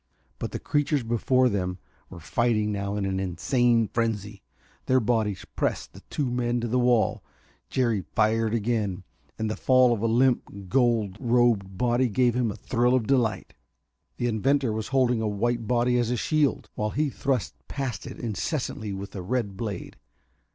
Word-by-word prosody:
But - - -4
the - - -3
creatures 145 -2 0
before 125 +3 +2
them 90 -4 -1 0.3
were 90 - -10
fighting 110 +5 0
now 100 0 -2
in 100 -1 -1
an 95 0 -1
insane 115 +5 +2
frenzy. 105 -3 -2 0.5
Their 130 0 +4
bodies 110 -4 0
pressed - - -2
the - - -11
two 145 - -1
men 120 0 0
to 120 - -2
the 125 +3 +1
wall. 120 -3 +2 0.5
Jerry 115 -7 +1
fired 110 +1 +2
again, 105 -4 -1 0.3
and 110 - -1
the 110 - -2
fall 130 -2 +4
of 110 - -3
a 115 - +1
limp, 115 -5 +1
gold 115 -4 +2
robed 115 -6 +2
body 120 +3 +2
gave 120 +2 +2
him 125 -2 +1
a - - -7
thrill 120 +2 +1
of 125 -4 +1
delight. 120 -3 0 0.6
The - - -2
inventor 125 +2 +1
was 110 0 -3
holding 125 -4 +2
a 110 - 0
white 115 +2 -1
body 125 0 +2
as 120 -1 0
a 125 - 0
shield, 150 +1 +1
while 105 0 -2
he 145 +5 0
thrust 130 -5 -1
past 130 -8 -4
it - - -8
incessantly 110 - -3
with 100 +1 -7
a 95 - -4
red 105 0 -2
blade. 100 -3 -5
115 Hz, 170 wpm, -26 LUFS, 105-125 Hz, 0.6 s, Their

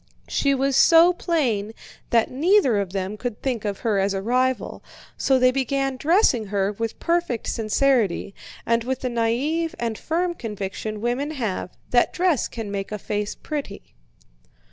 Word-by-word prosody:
She 280 -1 +1
was 270 0 0
so 335 +4 +7
plain 245 - -1 0.4
that 230 -1 +2
neither 285 - +3
of 195 -3 -3
them 195 +2 -3
could 240 -1 -4
think 245 -5 -2
of 200 -2 -3
her 220 -5 +1
as 195 +1 0
a 195 - -2
rival, 255 +3 0 0.3
so 265 - +2
they 255 0 +4
began 270 +1 -1
dressing 285 - +2
her 200 0 0
with 225 +2 -4
perfect 335 -9 -1
sincerity, 225 -4 +1 0.3
and 230 0 +1
with 260 +1 -3
the 255 - -1
naïve 255 +8 0
and 230 -2 -3
firm 345 +2 -1
conviction 210 - -5
women 245 +5 -1
have 225 - -4
that 240 -1 +3
dress 355 -6 +1
can 225 -3 -6
make 195 0 -4
a 210 - -2
face 210 +1 -3
pretty. 285 -10 -6
240 Hz, 160 wpm, -23 LUFS, 210-275 Hz, 0.4 s, so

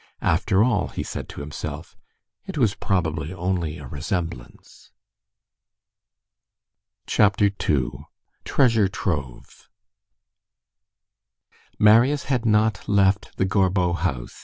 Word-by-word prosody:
"After 95 +5 +2
all," 125 0 +1
he - - -5
said - - -6
to - - -8
himself, 75 +1 -7 0.5
"it - - -6
was 115 -7 +2
probably 80 -6 -2
only 90 -3 -2
a 75 - -10
resemblance." 75 - -6 2.2
CHAPTER 100 0 +3 0.2
II—TREASURE 105 - 0
TROVE 70 - -5 2.1
Marius 120 +7 +5
had 125 -4 -1
not 105 -1 +1
left 100 0 +2
the 95 - +1
Gorbeau 95 -2 +1
house. 80 -9 -3
95 Hz, 90 wpm, -23 LUFS, 80-105 Hz, 2.2 s, Marius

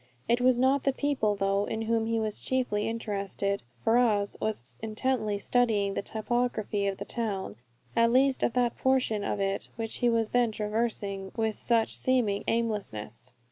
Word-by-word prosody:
It 240 +1 +2
was 255 -1 +4
not 265 +2 +3
the 275 - +2
people, 265 -8 0
though, 195 0 +1
in 220 0 -3
whom 225 0 +1
he 230 0 +1
was 215 -1 -2
chiefly 245 -5 0
interested. 200 -3 -2 0.2
Ferrars 225 -3 +3
was 125 - -3
intently 220 -1 -1
studying 210 -3 +1
the - - -1
topography 220 -1 -1
of 195 -1 -2
the - - -6
town, 200 - -3 0.4
at 230 0 +4
least 265 +2 +3
of 235 - +1
that 245 -2 +1
portion 255 -6 +2
of 205 - -2
it 195 0 -1
which 225 -1 -4
he 245 - +2
was 225 -2 +1
then 245 -2 +2
traversing 210 -3 -2
with 220 -1 -1
such 230 -2 +2
seeming 240 -6 +1
aimlessness. 200 - -2
220 Hz, 165 wpm, -28 LUFS, 200-240 Hz, 0.4 s, was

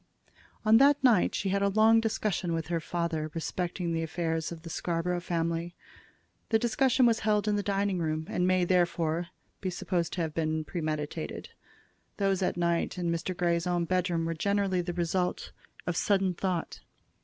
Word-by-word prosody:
On 220 +1 +7
that 280 +2 +5
night 235 -8 +4
she 195 - -1
had 200 +1 +1
a 200 - +3
long 220 +3 +5
discussion 210 -5 -1
with 165 -1 -3
her 170 -1 0
father 165 -1 -2
respecting 175 +1 -2
the 165 - 0
affairs 165 0 -2
of 165 -1 -8
the 165 - -8
Scarborough 175 +1 -1
family. 170 0 -2 0.7
The 225 - +4
discussion 250 +3 +2
was 230 -1 +3
held 210 -1 +1
in 210 - +2
the 205 - +1
dining 200 -2 0
room, 155 -1 -1
and 180 - 0
may, 185 -1 +3
therefore, 175 -2 +1 0.3
be 190 - -2
supposed 175 -1 -2
to 180 - -2
have 160 -2 -2
been 155 -1 -1
premeditated. 155 -1 -4 0.7
Those 195 -2 +1
at 180 - 0
night 170 0 0
in 175 -1 -1
Mr. 170 +2 -3
Grey's 170 0 +1
own 175 -1 +1
bedroom 175 -2 0
were 165 - -1
generally 195 +1 0
the 175 0 -4
result 180 +1 -1 0.3
of 175 - -1
sudden 195 -1 +2
thought. 180 -1 -3
175 Hz, 175 wpm, -29 LUFS, 165-195 Hz, 0.7 s, On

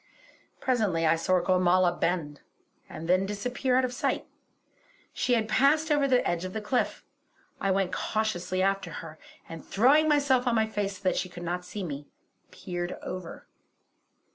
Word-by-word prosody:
Presently 210 -11 +1
I 160 - +4
saw 185 +3 +2
Gormala 180 0 +3
bend, 165 -4 -1 0.5
and 165 - -7
then 185 +2 +3
disappear 250 +5 -1
out 260 - +3
of 250 - -4
sight. - - -1 0.9
She 245 - +1
had 220 -2 0
passed 290 +7 +3
over 290 -2 +3
the 255 -2 +2
edge 175 0 -1
of 185 - -5
the 220 - -2
cliff. 245 +4 -1 0.5
I 195 - 0
went 190 -1 +1
cautiously 185 -4 -1
after 195 0 0 0.2
her, 155 -1 -11 0.3
and 165 0 -9
throwing 285 +9 +4
myself 275 -4 +3
on 240 - +2
my 220 -1 +3
face 205 -3 -3
so 190 - -20
that 185 - +1
she 185 - -2
could 175 0 -9
not 175 +1 -3
see 200 +2 -6
me, 145 -4 -6 0.4
peered 175 0 -5
over. 180 -2 -7
195 Hz, 165 wpm, -28 LUFS, 175-245 Hz, 0.9 s, I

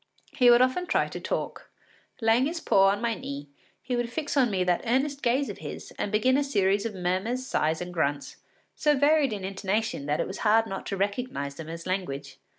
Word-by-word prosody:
He 250 -2 +4
would 240 +1 +7
often 305 +8 0
try - - +2
to - - -6
talk; - - -4 0.5
laying 225 +4 +3
his 335 +2 -3
paw 195 -10 +4
on 200 +2 +1
my 235 -1 +1
knee, 140 -7 -7 0.3
he 250 - -2
would 240 -1 -2
fix 300 +3 -3
on 260 -4 +4
me 190 -3 0
that 180 -1 +1
earnest 275 +4 0
gaze 260 +3 +1
of - - -7
his - - -8
and 205 - -2
begin 255 +5 +3
a 285 - +2
series 200 -5 +1
of 215 - -8
murmurs, 190 +8 -1
sighs, 160 -8 0
and 180 0 -6
grunts, 145 -4 -2 0.4
so 295 -1 +2
varied 290 -1 +4
in 200 -3 -4
intonation 195 -4 -2
that 150 +1 0
it - - +1
was 190 - -7
hard 225 +1 +4
not 195 -3 -6
to 195 - -3
recognise 200 - -2
them 160 +2 -9
as 165 0 -7
language. 140 -8 -4
210 Hz, 215 wpm, -27 LUFS, 180-255 Hz, 0.5 s, would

